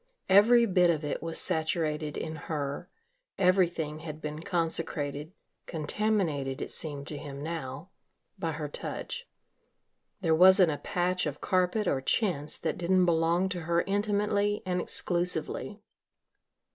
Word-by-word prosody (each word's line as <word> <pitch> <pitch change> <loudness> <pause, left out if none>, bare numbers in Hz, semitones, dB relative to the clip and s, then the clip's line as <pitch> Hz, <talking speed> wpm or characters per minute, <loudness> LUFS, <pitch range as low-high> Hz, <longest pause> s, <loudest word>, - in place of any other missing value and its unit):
Every 230 +5 +7
bit 180 -4 +3
of 160 -2 +1
it 145 - -3
was 165 -1 -3
saturated 155 -3 0
in 160 0 -4
her, 145 +2 -3 0.5
everything 175 -5 +2
had 155 -1 -7
been 150 0 -5
consecrated 160 -4 -2 0.4
contaminated, 155 -5 -1
it - - -4
seemed 145 -3 -3
to 145 0 -5
him 140 -1 -7
now 160 +1 -5 0.5
by 165 -3 -2
her 150 0 -4
touch. 480 - -6 0.9
There 165 -3 +2
wasn't 185 +1 +7
a 145 - -4
patch 180 -1 -1
of 145 -1 -5
carpet 185 +3 +1
or 135 - +1
chintz 155 - 0
that - - -3
didn't 180 +1 +3
belong 170 +2 +2
to 180 -2 -4
her 170 +1 +1
intimately 205 0 0
and 180 -1 0
exclusively. 180 +4 -1
170 Hz, 135 wpm, -29 LUFS, 150-185 Hz, 0.9 s, Every